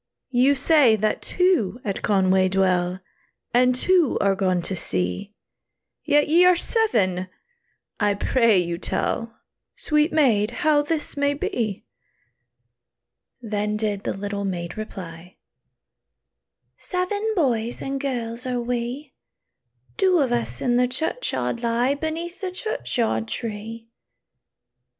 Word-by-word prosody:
"You 260 +3 +4
say 280 -4 +5
that 215 0 -1
two 355 - +1
at 200 -2 -3
Conway 190 -2 +3
dwell, 185 -1 +1 0.5
And 250 +1 +4
two 345 +2 +3
are 200 -1 +3
gone 185 -2 0
to 190 - -3
sea, 90 - -2 0.7
Yet 295 -1 +3
ye 335 +4 +5
are 360 0 +6
seven! 210 - 0 0.7
I 205 -2 +2
pray 230 0 +3
you 170 -1 -1
tell, 230 +4 -2 0.4
Sweet 300 +2 +1
maid, 235 -9 +3 0.2
how 300 -1 +5
this 300 +1 -2
may 285 0 +1
be." 220 -7 -3 1.6
Then 210 -1 -2
did 210 -2 -2
the - - -3
little 200 0 -4
maid 175 -3 -4
reply, 180 -5 -8 1.4
"Seven 405 +4 -2
boys 240 - 0
and 275 0 -4
girls 245 -2 -4
are 250 -1 -1
we; 245 +4 -4 0.8
Two 380 -4 +3
of 275 -6 +1
us 240 -1 -2
in 245 -2 +2
the 250 0 +3
churchyard 265 - -2
lie, 240 +3 +1
Beneath 320 +5 -5
the 375 -2 -3
churchyard 250 - -2
tree." 225 0 -5
235 Hz, 120 wpm, -23 LUFS, 200-295 Hz, 1.6 s, are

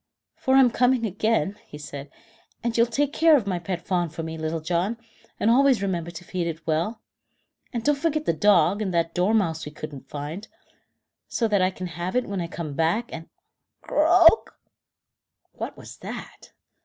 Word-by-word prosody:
"For 265 - +1
I'm 265 -3 +6
coming 250 0 +2
back 220 - -1
again," 210 0 0
he 150 - -10
said, 145 -1 -8 0.5
"and 235 -1 -1
you'll 235 0 +4
take 285 +4 0
care 320 -2 +6
of 235 - -2
my 185 -3 -1
pet 175 0 -5
fawn 175 -3 0
for 160 +1 -6
me, 160 0 -5
Little 160 +1 -3
John, 175 +7 -1 0.4
and 220 - +3
always 260 -3 +4
remember 175 -4 -2
to 170 0 -9
feed 180 -2 -3
it 165 0 -6
well. 170 +8 -1 0.7
And 235 -3 -3
don't 295 +3 +3
forget 310 0 0
the - - +2
dog 205 +4 +3
and 195 -3 -1
that 165 0 +1
dormouse 180 -4 +1
we 150 - -7
couldn't 150 -2 -9
find, 150 +9 -6 0.8
so 230 - 0
that 205 -2 +2
I 185 - +3
can 185 -1 -7
have 175 +3 -4
it 250 - +2
when 195 -2 -3
I 170 - -3
come 165 -3 -6
back, 165 +10 0
and 165 0 -8 0.3
" - - -57
Croak! 335 +5 +5 0.9
What - - -6
was - - -11
that? - - -9
190 Hz, 190 wpm, -25 LUFS, 165-235 Hz, 0.9 s, I'm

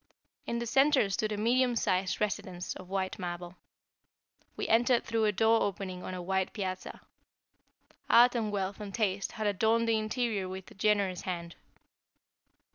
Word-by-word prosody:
In 235 - -1
the 235 - -2
center 270 -3 +3
stood 215 +3 -1
a 210 - -2
medium 245 +3 +2
sized 185 -4 0
residence 185 -3 -3
of 185 - -11
white 190 +1 -2
marble. 175 0 -6 1.0
We - - -2
entered 235 +1 +3
through 225 -1 0
a 210 - +3
door 225 +2 +3
opening 185 -2 -3
on 185 - -5
a 180 - -5
wide 190 +1 -1
piazza. 190 -3 -5 1.1
Art 245 +1 +7
and 225 -3 -1
wealth 195 0 -2
and 205 -2 -6
taste 200 -3 -1
had 220 -2 -4
adorned 220 +3 +2
the 225 -1 +3
interior 215 -3 -1
with 190 0 -8
a - - -11
generous 200 -3 +1
hand. 170 -2 -5
205 Hz, 160 wpm, -30 LUFS, 185-225 Hz, 1.1 s, Art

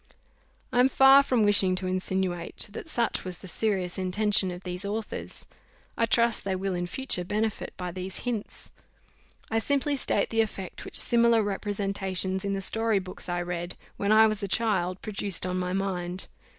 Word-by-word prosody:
I 245 - +2
am 255 +2 +5
far 270 +1 +7
from 250 -5 +1
wishing 200 -3 +5
to 185 0 -2
insinuate 185 -1 -2
that 315 - -8
such 235 -6 0
was 185 -2 -5
the 190 - -11
serious 190 -1 -1
intention 195 +1 +4
of 180 +1 -7
these 180 +1 -3
authors. 210 +2 -5 0.5
I 230 - +1
trust 235 -1 +2
they 195 -1 -1
will 190 0 -2
in 175 0 -2
future 260 -4 0
benefit 215 +3 -2
by 180 -1 -4
these 185 +1 -3
hints. 230 -4 -4 0.8
I 225 - +2
simply 285 +4 0
state 270 - 0
the 225 0 +3
effect 195 -4 -5
which - - -5
similar 235 -1 +4
representations 195 -2 -2
in 200 0 -1
the 195 - -3
story 225 +2 0
books 185 -1 -5
I 175 0 -1
read, 175 0 -5 0.2
when 200 +1 0
I 220 +1 +7
was 215 -1 +1
a 200 - -2
child, 190 -4 0
produced 200 -3 -2
on 185 0 -2
my 180 0 -2
mind. 185 -1 -3
195 Hz, 175 wpm, -27 LUFS, 185-220 Hz, 0.8 s, far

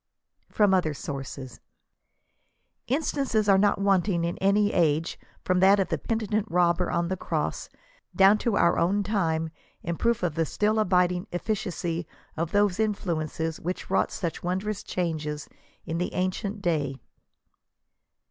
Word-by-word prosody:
FROM 205 -3 +3
OTHER 160 -5 +1
SOURCES. 135 -2 -7 1.3
Instances 265 -5 0
are 195 -1 +5
not 205 0 +3
wanting 195 -3 +2
in 170 0 -1
any 205 +2 +3
age, 160 -1 +1 0.2
from 185 0 +1
that 195 +2 +6
of 195 - 0
the - - -1
peni 225 -2 -2
tent 215 +1 0
robber 175 0 +2
on 170 0 0
the 190 - -1
cross, - - -3 0.5
down 195 +2 +6
to 225 -4 0
our 170 - +3
own 195 +5 +2
time, 165 -6 0 0.3
in 170 0 -3
proof 235 -4 +1
of 175 -4 0
the 165 +1 +1
still 215 +6 +1
abiding 180 -3 +2
efficacy 175 -4 -3 0.3
of 165 +1 -2
those 205 -1 +2
influences 165 -6 -2
which 180 +3 -5
wrought - - +2
such 170 -3 -4
wondrous 190 +4 -2
changes 155 -4 -3 0.4
in 165 0 -3
the 180 - -3
ancient 195 +2 -2
day. 145 -6 -1
180 Hz, 145 wpm, -26 LUFS, 165-205 Hz, 1.3 s, that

